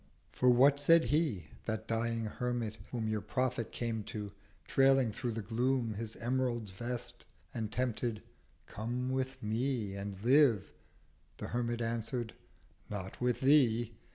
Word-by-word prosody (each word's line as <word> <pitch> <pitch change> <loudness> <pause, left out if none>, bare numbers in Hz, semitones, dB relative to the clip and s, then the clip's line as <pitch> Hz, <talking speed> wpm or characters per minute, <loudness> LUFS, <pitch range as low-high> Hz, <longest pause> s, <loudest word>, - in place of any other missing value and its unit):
280 - - -17
For 125 - +5
what 140 +2 +6
said 165 +3 +6
He, 145 - +1 0.2
that 110 -1 -3
dying 115 0 0
Hermit, 115 -1 -3
whom 115 -3 -2
Your 110 -1 -1
Prophet 125 +2 -1
came 115 -2 -2
to, 105 -2 -5 0.4
trailing 135 -3 +4
through 120 +2 -3
the 110 -1 -4
Gloom 120 +2 0
His 110 +1 -5
Emerald 120 -3 -1
Vest, 120 +4 -5 0.3
and 110 -3 -3
tempted—'Come 120 0 -4
with 130 -1 -2
Me, 110 -1 -1
And 100 -1 -5
Live.' 125 -6 +4 0.7
The - - -6
Hermit 120 -1 -1
answered—'Not 115 -4 -6
with 125 0 +1
Thee. 120 -5 +4
120 Hz, 130 wpm, -33 LUFS, 110-130 Hz, 0.7 s, what